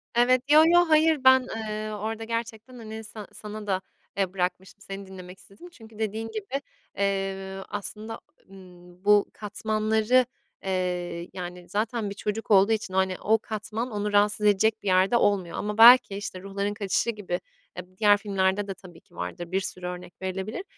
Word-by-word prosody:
Evet, 245 +1 +4
yo 305 +1 +8
yo, 345 +1 +6
hayır 310 -2 +4
ben, 260 -1 +6
eee, 215 -1 -4
orada 220 +2 -4
gerçekten 230 +1 -5
hani 220 -1 -8
sa 215 -2 -9
sana 210 0 -8
da, 190 -1 0 0.4
eee, 190 -2 0
bırakmıştım, 185 +1 -3
seni 195 -1 -7
dinlemek 185 -1 -11
istedim. 200 - -15
Çünkü 220 -8 -15
dediğin 220 +1 -2
gibi, 220 +6 -4 0.4
eee, 195 -1 -2
aslında, 210 +2 -6 0.3
ımm, 180 -1 -16
bu 210 -1 +5
katmanları, 215 +3 +1 0.4
eee, 180 -2 -2
yani, 180 -1 -7
zaten 220 0 -1
bir 200 - -7
çocuk 210 +2 -4
olduğu 200 +2 +6
için, 215 -4 -1
hani, 190 -1 +1
o 220 +2 +3
katman 220 +3 -5
onu 210 0 -2
rahatsız 205 +1 +3
edecek 220 +2 +3
bir - - -5
yerde 190 +5 +4
olmuyor 195 -6 +1
ama 210 0 -3
belki, 235 -2 +8
işte, 200 -2 -6
Ruhların 200 +1 -3
Kaçışı 205 +2 -1
gibi 205 -5 -3 0.4
eb 180 0 -7
diğer 205 -1 +5
filmlerde 200 -1 0
de 195 - -3
tabii 180 -3 -15
ki 175 - -25
vardır, 175 -1 -6
bir 190 +1 +1
sürü 185 -1 -6
örnek 180 0 -7
verilebilir. 190 - -4
205 Hz, 170 wpm, -26 LUFS, 190-220 Hz, 0.4 s, yo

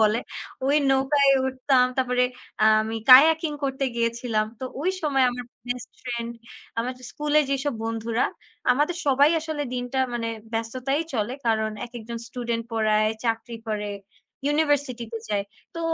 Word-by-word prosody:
বলে, 215 +1 +4 0.5
ওই 285 +2 +4
নৌকায় 275 +1 +4 0.2
উঠতাম। 260 -1 +3
তারপরে 250 -1 +2 0.6
আমি 220 +1 -3
কায়াকিং 315 +4 +8
করতে 270 0 -1
গিয়েছিলাম। 230 -2 0
তো - - -3 0.2
ওই 365 +4 +1
সময় 275 -4 +3
আমার 245 0 -6 0.2
বেস্টফ্রেন্ড 240 -1 -5 0.5
আমাদের 250 +1 -5
স্কুলের 300 0 +2
যেসব 275 -1 0
বন্ধুরা, 225 +1 -1 0.5
আমাদের 295 +7 +1
সবাই 280 +2 +5
আসলে 310 -2 -3
দিনটা 245 +1 -3 0.2
মানে 230 -1 -2 0.2
ব্যস্ততায় 255 +6 -1
চলে। 220 +1 -1
কারণ 220 -1 +2 0.2
একেকজন 235 -1 -7
স্টুডেন্ট 235 -1 -3
পড়ায়, 215 -1 +2
চাকরি 230 0 -2
করে, 210 -1 -2 0.6
ইউনিভার্সিটি 290 -5 +1
তে 225 - -3
যায়। 205 -1 0 0.3
তো 335 - -4
250 Hz, 130 wpm, -25 LUFS, 230-275 Hz, 0.6 s, কায়াকিং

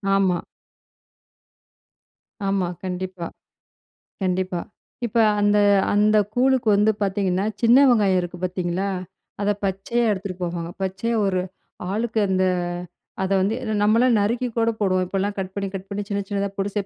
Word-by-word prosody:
ஆமா. 190 -3 +2 2.1
ஆமா, 195 -2 +1 0.2
கண்டிப்பா. 185 -1 -4 0.9
கண்டிப்பா. 185 -1 -1 0.4
இப்ப 235 - -2 0.2
அந்த 205 0 +3 0.4
அந்த 210 +1 +4 0.2
கூழுக்கு 260 -1 +2
வந்து 210 +2 +4
பாத்தீங்கன்னா, 195 0 0 0.2
சின்ன 235 +2 +6
வெங்காயம் 200 -6 +4
இருக்கு 175 0 -6
பாத்தீங்களா, 185 +1 -1 0.5
அத 205 0 +2
பச்சையா 195 +5 -1
எடுத்துட்டு 190 -2 -4
போவாங்க. 170 -1 -3
பச்சையா 195 +5 -1
ஒரு 185 -2 +1 0.5
ஆளுக்கு 220 +2 -1
அந்த 185 0 +2 0.8
அத 190 - -2
வந்து 200 +4 +1
ஏன்னா 220 -3 -2
நம்மல்லாம் 230 +3 +4
நறுக்கி 235 +5 0
கூட 230 0 +3
போடுவோம். 185 -3 +2
இப்பல்லாம் 195 +2 -2
கட் 190 -1 -3
பண்ணி 200 -1 -2
கட் 190 0 -6
பண்ணி, 205 0 -3
சின்ன 200 -1 -1
சின்னதா 200 -1 -1
போட்டு 200 0 -2
195 Hz, 130 wpm, -23 LUFS, 185-215 Hz, 2.1 s, சின்ன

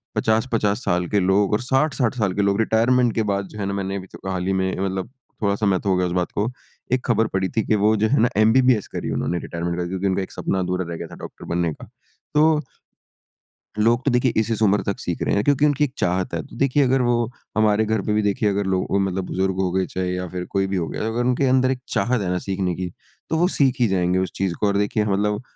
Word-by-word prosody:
50-50 110 0 +1
साल 90 0 0
के 105 - +1
लोग 95 +2 +2
और 105 - +2
60-60 130 -1 +1
साल 100 -4 0
के - - +3
लोग 100 +1 +1
रिटायरमेंट 115 +2 +3
के 110 - +1
बाद 100 0 -1
जो 105 - -8
है 100 - -2
ना, 100 - -2
मैंने 95 0 -3
अभी 95 - -13
तो 95 - -7
हाल 90 -1 -2
ही 95 - +1
में, 95 - 0
मतलब 95 +1 -2 0.3
थोड़ा 100 -1 +2
समय 100 -3 +1
तो 100 - 0
हो 95 - +3
गया 90 - +1
इस 85 - -4
बात 90 - -4
को, 105 +4 +1 0.4
एक 130 0 +1
खबर 115 -2 +2
पढ़ी 95 -1 0
थी 110 - +3
कि 110 - +2
वो 110 +1 +4
जो 110 - +4
है 140 - +3
ना, 120 - +4
एमबीबीएस 115 0 +4
करी - - -3
उन्होंने 90 - -1
रिटायरमेंट 85 0 -4
के 90 - -4
बाद, 85 - -2
क्योंकि 95 +1 -1
उनका 95 0 0
एक - - -9
सपना 95 - -2
अधूरा 90 0 -1
रह 85 - -4
गया - - -5
था - - -11
डॉक्टर - - -10
बनने 85 -2 0
का। - - -12 0.5
तो 150 - +5 1.4
लोग 120 +3 +3
तो 140 - +3
देखिए, 125 0 +2
इस-इस 110 0 0
उम्र 105 -1 +3
तक 100 - -3
सीख - - -4
रहे - - 0
हैं, 100 - +1
क्योंकि 145 0 +3
उनकी 145 -1 +2
एक 135 -3 -1
चाहत 90 0 0
है। 85 - -1
तो - - -14
देखिए, 140 +2 +3
अगर 130 0 +2
वो 120 -1 +1 0.3
हमारे 110 0 +3
घर 110 -1 0
पे 105 - -1
भी, 105 - +2
देखिए, 105 +1 +1
अगर 100 0 -1
लो 95 -1 +1
अ, 100 - -1
मतलब 95 -1 -1
बुज़ुर्ग 95 +1 -1
हो 90 - 0
गए, 95 0 +1
चाहे 90 -1 -3
या 90 0 -3
फिर 90 -1 -5
कोई 95 -1 +1
भी 95 - -2
हो 85 -2 -1
गया, - - -4
अगर 115 +2 -1
उनके 125 +2 +2
अंदर 130 0 +3
एक 130 - -2
चाहत 120 -1 +1
है 90 - -2
ना 90 - 0
सीखने 95 -2 -1
की, 90 0 -4 0.4
तो 160 - +1
वो 175 +2 +3
सीख 135 -3 +3
ही 120 - +4
जाएँगे 90 -1 +1
उस 95 -1 -2
चीज़ 95 -2 -1
को 105 - +5
और 100 - +1
देखिए 105 +1 +1
ह - - -3
मतलब 105 +2 0
100 Hz, 270 wpm, -22 LUFS, 95-120 Hz, 1.4 s, तो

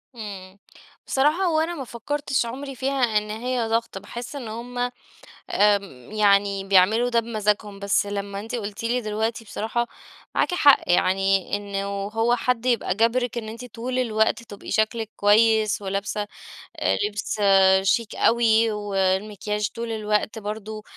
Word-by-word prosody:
إمم، 195 -4 -8 0.5
بصراحة 300 +8 +2
هو 325 -3 +2
أنا 330 +2 -1
ما 280 - -5
فكرتش 265 +2 -2
عمري 270 +3 -6
فيها 260 -4 +1
إن 210 0 -1
هي 240 +1 -2
ضغط، 230 -2 -1
باحس 240 +7 -8
إن 255 -5 -6
هم، 235 +3 -7 0.7
آمم 200 - +1
يعني 200 -2 +3
بيعملوا 200 +5 +4
ده 235 -1 +3
بمزاجهم، 210 -3 -1
بس 200 0 +1
لما 200 0 -4
أنتِ 225 +4 -5
قلتِ 210 -1 -5
لي 240 +2 0
دلوقتي 220 +1 -2
بصراحة 225 +3 -2 0.5
معاكِ - - +1
حق، 290 -5 +6
يعني 195 +2 +2
إنه 200 -1 -4 0.2
هو 225 +3 +1
حد 250 0 -1
يبقى 235 -7 +1
جابرِك 235 +2 +1
إن 220 -2 -4
أنتِ 230 +3 -8
طول 250 +2 -4
الوقت 220 -1 +1
تبقي 205 -3 -10
شكلِك 220 0 0
كويس، 215 0 +3
ولابسة 200 +2 -3 0.5
آآ، 95 +1 +1
لبس 210 +1 -4 0.5
شيك 230 +2 +1
أوي 230 -1 +3
والمكياج 205 +1 -1
طول 230 0 -4
الوقت 215 +1 -1
برضه، 215 0 -6
220 Hz, 145 wpm, -24 LUFS, 205-235 Hz, 0.7 s, حق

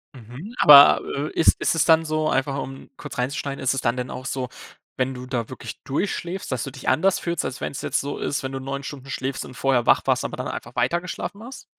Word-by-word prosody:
Mhm. 130 - -10
Aber, 145 -1 +9
äh, 145 +2 -2
ist 165 - +4
ist - - +1
es 165 - +2
dann 165 -1 +5
so 155 0 0
einfach 135 +1 0
um 135 0 -9
kurz - - -9
reinzuschneiden 140 +2 -3
ist 130 - +2
es 135 - -2
dann 120 +1 0
denn 125 0 -4
auch 130 - -6
so, 130 -2 -3 0.5
wenn 130 0 -1
du 125 0 -7
da 125 -3 -3
wirklich 130 - -8
durchschläfst, 175 +4 -3
dass 125 -4 -1
du - - -5
dich 130 -1 -10
anders 185 +9 +3
fühlst, 170 -2 -2
als 130 - -5
wenn - - -2
es 140 - -6
jetzt - - 0
so 140 +1 -4
ist 145 - -2
wenn 130 - -3
du 135 - -4
9 135 +1 -5
Stunden 135 -1 -8
schläfst 130 0 -3
und 130 - -11
vorher 130 -2 +1
wach - - +5
warst, - - +2
aber - - -5
dann - - -4
einfach - - -7
weitergeschlafen 175 +4 -2
hast? 260 +3 -10
135 Hz, 245 wpm, -23 LUFS, 130-155 Hz, 0.5 s, Aber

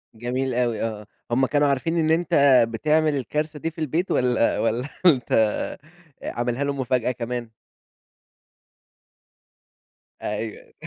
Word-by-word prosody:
جميل 125 +3 -2
أوي، 120 -3 0
آه، 105 -2 -4 0.2
هم 130 +3 +3
كانوا 145 +2 +2
عارفين 150 +5 0
إن 160 -1 +2
أنت 165 0 0 0.4
بتعمل 155 +6 +1
الكارثة 150 +4 -3
دي 165 +3 -3
في 165 - -9
البيت 160 +5 -1
والَّا 125 -2 +2
والَّا 120 +5 -1 0.2
أنت 135 -9 +4 0.9
آآ، - - -3
عاملها 120 +3 -1
لهم 140 -1 -2
مفاجأة 125 -1 0
كمان؟ 120 -1 -4 2.7
أيوه. 105 +1 -5
130 Hz, 120 wpm, -24 LUFS, 120-150 Hz, 2.7 s, أنت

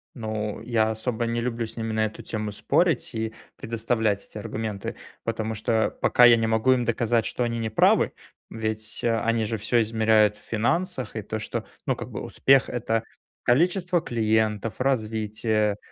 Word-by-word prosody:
Ну, 110 -2 -4
я 110 -2 +1
особо 115 +1 -2
не 115 0 -1
люблю 115 -1 -2
с 110 - -10
ними 115 -1 -3
на 110 0 +2
эту 110 - -6
тему 105 -1 -4
спорить 160 - +1
и 110 0 -2 0.2
предоставлять 110 -2 -1
эти - - -11
аргументы, 105 -1 -4 0.3
потому 110 -1 -2
что 110 +1 +1
пока 125 - +4
я 120 -1 +9
не 115 -1 0
могу 110 +3 +3
им 125 - +1
доказать, 115 -1 +1
что 125 - -1
они 115 0 -1
не 115 -1 -2
правы, 110 - +4 0.4
ведь, 110 -1 -4
э, 115 -1 +2
они 115 -1 +1
же 115 +1 -2
всё 120 +2 +2
измеряют 110 -1 +3
в 105 - -15
финансах. 130 - -1
И 110 - -2
то, 110 +2 -4
что, - - -4 0.2
ну, - - +2
как - - -7
бы - - -5
успех- 135 -1 +3
это 115 -2 -1 0.4
количество 175 +6 +2
клиентов, 110 -4 0
развитие 110 -4 0
110 Hz, 175 wpm, -25 LUFS, 110-120 Hz, 0.4 s, я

